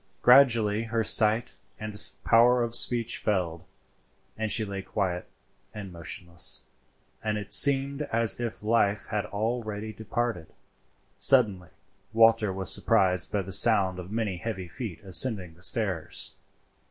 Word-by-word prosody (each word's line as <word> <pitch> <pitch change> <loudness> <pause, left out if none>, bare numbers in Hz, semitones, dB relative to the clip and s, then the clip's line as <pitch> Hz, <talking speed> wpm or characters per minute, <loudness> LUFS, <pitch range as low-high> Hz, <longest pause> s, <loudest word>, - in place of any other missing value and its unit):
Gradually 115 -4 +4
her 115 0 -2
sight 110 +2 +2 0.2
and 105 -1 -7 0.3
power 120 +2 +3
of 115 -1 -5
speech 120 -1 +1
failed, 90 -5 -3 0.7
and 110 -1 -3
she 110 - 0
lay 100 -1 -6
quiet 95 -2 -4 0.5
and 100 -4 -9
motionless, 85 -2 -2 0.6
and 105 -1 -2
it 105 -1 -8
seemed 140 0 +3
as 115 0 +3
if 115 -2 -6
life 105 -2 0
had 105 -1 -3
already 110 0 -5
departed. 110 -6 -4 0.7
Suddenly 105 - +2 0.4
Walter 115 -2 +3
was 95 -2 +4
surprised 90 -1 +1
by 100 -2 -2
the 95 +1 -4
sound 95 -3 +3
of 90 0 -9
many 110 -4 -3
heavy 95 -2 -6
feet 110 -2 -8
ascending 95 -2 +2
the 85 - -23
stairs. 95 -5 -2
105 Hz, 130 wpm, -26 LUFS, 95-115 Hz, 0.7 s, Gradually